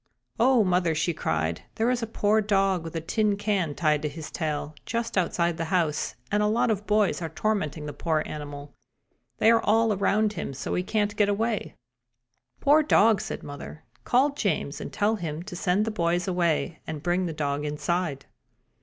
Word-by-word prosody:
"Oh, 245 -1 +5
mother!" 180 -3 +1
she 170 +3 0
cried. 80 - -1
"There 230 +3 +2
is 250 -1 0
a 230 - -2
poor 215 0 +2
dog 195 -4 +1
with 165 0 -8
a 165 - -1
tin 210 +4 +1
can 200 -8 -1
tied 150 -3 +2
to 150 - -2
his 155 +1 -8
tail, 150 -2 -3
just 230 0 -3
outside 170 -2 +1
the 165 - -2
house, 165 -4 0 0.2
and 210 - +2
a 210 - +3
lot 225 +2 +2
of 210 -1 -3
boys 210 -3 +2
are 165 - -3
tormenting 160 -5 -2
the 145 - -5
poor 160 -2 0
animal. 145 -1 -7 0.6
They 225 - +5
are 230 0 +4
all 225 +1 +3
around 205 +2 +1
him 140 - -5
so - - -5
that - - 0
he 180 - 0
can't 210 0 0
get 205 -1 +3
away." 215 +2 -1 0.9
"Poor 295 +2 +5
dog!" 225 -8 +4
said 215 - -5
mother. 145 +2 -9 0.2
"Call 260 - +3
James 175 - -2
and - - -6
tell 215 +2 +1
him 165 -3 -4
to 190 -1 -8
send 185 +4 +1
the 225 - -2
boys 175 -2 0
away 170 -3 0
and 155 -1 -5
bring 180 +1 +1
the - - -3
dog 145 -2 -2
inside." 150 -1 -2
180 Hz, 195 wpm, -26 LUFS, 155-215 Hz, 0.9 s, Oh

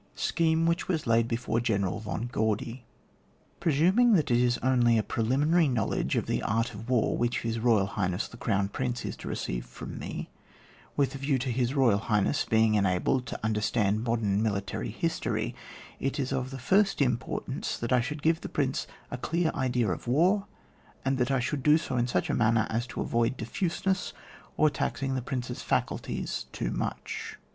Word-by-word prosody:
SCHEHE 165 -1 +1
WHICH 170 +1 +1
WAS 165 -5 -1
LAID 115 0 +3
BEFORE 115 0 -1
GENERAL 105 -4 0
VON 110 +1 -4
GAUDY. 115 +3 -1 0.7
pRESUMnra 185 - +4
that 155 -7 +1
it 120 - +4
is 120 0 +3
only 120 -3 +4
a 110 - +2
preliminary 145 +11 +2
knowledge 115 -6 0
of - - 0
the - - -1
art 115 +2 0
of 110 +4 -9
war 125 -3 +2
which 120 0 0
His 115 0 -2
Boyal 110 -4 +3
Highness 95 -1 -1
the - - -13
Crown 100 -4 0
Prince 125 +2 -3
is - - -4
to - - -9
receive - - -3
from - - -8
me, - - -6 0.7
with 140 -2 +2
a 135 - -6
view 135 0 +1
to 130 0 -2
His 125 +1 0
Boyal 125 -8 +4
Highness 110 +5 +1
being 110 -1 +3
enabled 100 +6 +1
to - - -5
under 110 -1 0
stand 105 -1 +1
modem 110 -4 +1
military 100 -3 -2
history, - - -2 0.5
it 135 +2 -2
is 135 -1 -1
of 130 -1 -1
the 135 - -6
first 195 +10 +2
importance 130 0 -1
^at 115 - -2
I 125 -1 +5
should 150 +4 -5
give 165 +1 +2
the - - -6
Prince 135 -2 -1 0.2
a 125 - -4
clear 165 +4 0
idea 125 -5 0
of 90 - -5
war, 180 - +3 0.6
and 135 0 +1
that 125 +1 +1
I 135 -1 +2
should 135 +3 -2
do 150 +3 +5
so 160 -5 -4
in 120 0 +2
such - - 0
a - - -1
manner 110 -1 +3
as 115 +3 -1
to - - -5
avoid 115 +2 0
diffuseness, 185 - -1 0.4
or 155 -1 +4
taxing 135 -1 -2
the 130 - -1
Prince's 125 -1 -4
faculties - - -2
too - - -3
much. - - -4
125 Hz, 185 wpm, -28 LUFS, 110-140 Hz, 0.7 s, I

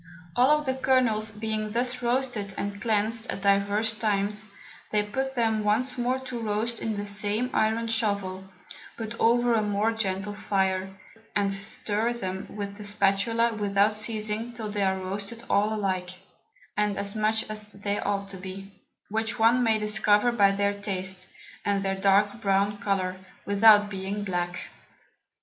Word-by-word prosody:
All 300 +5 +4
the 260 -2 0
Kernels 255 -5 +2
being 215 0 -3
thus 245 +3 -1
roasted 240 -5 -1
and 200 0 -4
cleansed 225 +1 0
at 195 - -4
divers 200 +2 +2
times, 210 0 -1 0.4
they 210 -1 +2
put 265 +6 -3
them 225 -3 +1
once 225 +5 +1
more 250 +1 0
to 255 -2 -6
roast 225 +1 -1
in 220 -2 -2
the 205 - -3
same 210 +4 0
Iron 220 +1 +1
Shovel, 200 -4 0 0.5
but 220 -1 -5
over 240 +1 +4
a 225 - +3
more 210 +1 +1
gentle 205 -2 -2
Fire, 190 -2 0 0.5
and 200 -1 +1
stir 210 +3 -2
them 190 -4 -5
with 200 -1 -6
the 210 - -8
Spatula 210 +3 +1
without 205 0 +2
ceasing 215 +1 -2
till 220 -2 -5
they 205 -1 -2
are 190 -1 +2
roasted 200 +5 -5
all 210 +2 +2
alike, 190 -4 -1 0.7
and 210 -1 0
as 200 +1 -2
much 215 +1 +1
as 215 0 -7
they 205 0 -3
ought 200 -1 -1
to 195 - -5
be; 190 +1 -8 0.4
which 220 +2 -1
one 230 +2 +4
may 225 -2 +3
discover 210 +2 +4
by 205 -4 +4
their 200 +1 +1
Taste, 190 -2 -4 0.4
and 200 -1 0
their 195 0 0
dark 200 +3 +2
brown 200 +1 +1
Colour, 190 -2 -1 0.3
without 205 0 +6
being 195 +1 -3
black. 175 -2 -2
210 Hz, 155 wpm, -27 LUFS, 200-225 Hz, 0.7 s, without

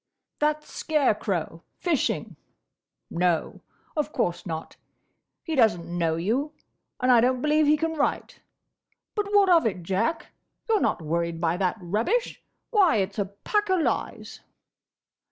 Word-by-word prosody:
"That 300 0 +1
scare 300 -7 +1
crow, 175 -6 -3 0.2
fishing. 335 -6 -1 0.8
No; 175 -1 0 0.3
of 300 -1 -1
course 175 - -2
not. 160 -1 -5 0.7
He 325 - -4
does 225 - +4
n't 170 - -9
know 170 -2 -1
you, 240 - -1 0.5
and 255 0 +3
I 240 -2 +6
don't 255 +1 +2
believe 300 +2 +2
he 305 +1 +5
can 325 +1 -1
write.—But, 405 +5 -5
what 405 -1 +5
of 335 -8 +5
it, 185 -5 -4
Jack? 195 - -1 0.4
You're 440 -3 +2
not - - 0
worried 170 +1 -1
by 165 0 +1
that 190 +2 0
rubbish! 220 - -1 0.3
Why, 395 - +4
it's 195 0 -1
a 200 - +1
pack 400 - -2
o' 375 - +4
lies!" 335 - -2
230 Hz, 140 wpm, -26 LUFS, -, 0.8 s, I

